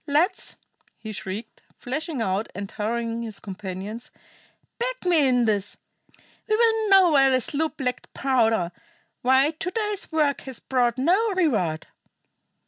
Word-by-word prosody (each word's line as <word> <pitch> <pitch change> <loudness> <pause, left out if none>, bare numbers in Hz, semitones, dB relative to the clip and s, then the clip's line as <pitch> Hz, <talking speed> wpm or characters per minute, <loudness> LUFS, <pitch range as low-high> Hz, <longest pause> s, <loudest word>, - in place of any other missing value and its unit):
Lads 325 +7 +1 0.2
" - - -37
he 220 - -5
shrieked, 205 +2 -7 0.2
flashing 275 0 -3
about 195 +2 -1
and 200 0 -5
haranguing 230 +2 -2
his 220 -3 -5
companions 195 +3 -7 0.7
"back - - -3
me 325 -6 +4
in 245 -2 +3
this. 205 -2 -1 0.7
We 430 - +4
will 445 -1 +3
know 380 -3 +7
why 270 -2 +5
the 260 -1 +3
sloop 305 +6 -2
lacked 250 -2 -3
powder; 225 -9 +2 0.5
why 265 +4 +4
to 365 +4 -4
day's 420 -2 -3
work 300 -3 +1
has 265 -3 -8
brought 250 -2 +1
no 380 - +2
reward!" 215 - +1
260 Hz, 140 wpm, -25 LUFS, 220-335 Hz, 0.7 s, know